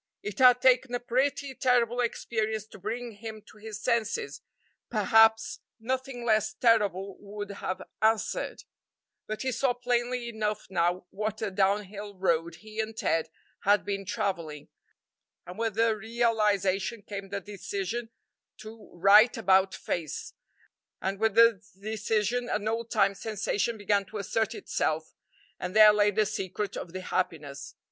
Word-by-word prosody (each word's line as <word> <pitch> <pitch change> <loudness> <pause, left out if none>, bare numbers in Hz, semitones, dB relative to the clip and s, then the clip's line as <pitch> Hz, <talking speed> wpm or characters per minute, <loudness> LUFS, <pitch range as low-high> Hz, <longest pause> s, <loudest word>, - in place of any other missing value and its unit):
It 210 -1 -6
had 250 -1 +6
taken 255 -1 +4
a - - -1
pretty 265 +3 0
terrible 245 -2 +2
experience 220 -2 -1
to - - -13
bring 225 +2 -5
him 220 -1 -8
to 215 - -18
his 215 -1 -7
senses; 235 - -1 0.5
perhaps 225 0 +4 0.2
nothing 255 +1 -3
less 215 -1 +2
terrible 200 -5 +2
would 205 0 -7
have 190 -1 -4 0.2
answered; 220 0 0 0.6
but 215 +3 -4
he 260 - 0
saw 255 +1 +1
plainly 245 0 -1
enough 215 -2 -2
now 175 0 +1
what 215 +1 -3
a 210 - -1
down 200 +2 +2
hill 205 +1 -9
road 170 -3 0
he 215 0 -8
and 220 0 -3
Ted 165 -1 0 0.3
had 205 +1 +3
been 200 -1 -2
travelling, 170 -7 -3 0.8
and 180 +4 -9
with 225 -3 -1
the 225 0 +3
realization 210 -2 0
came 200 -1 -7
the 200 - -3
decision 205 +3 -4 0.5
to 220 0 -12
"right 205 +6 +6
about 190 -3 +3
face," 165 -4 -4 0.7
and 195 +2 -3
with 220 -2 +1
the 230 -3 +6 0.2
decision 220 +3 -1
an 210 0 -1
old 230 +1 -2
time 200 -3 +3
sensation 215 +2 -2
began 205 -1 +1
to 215 - -8
assert 215 +2 -1
itself, 155 0 -2 0.5
and 180 +2 -5
there 215 -1 +9
lay 210 0 +4
the 210 +1 +2
secret 195 0 -3
of 170 - -6
the 185 +1 -6
happiness. 150 -7 -3
215 Hz, 145 wpm, -28 LUFS, 195-230 Hz, 0.8 s, there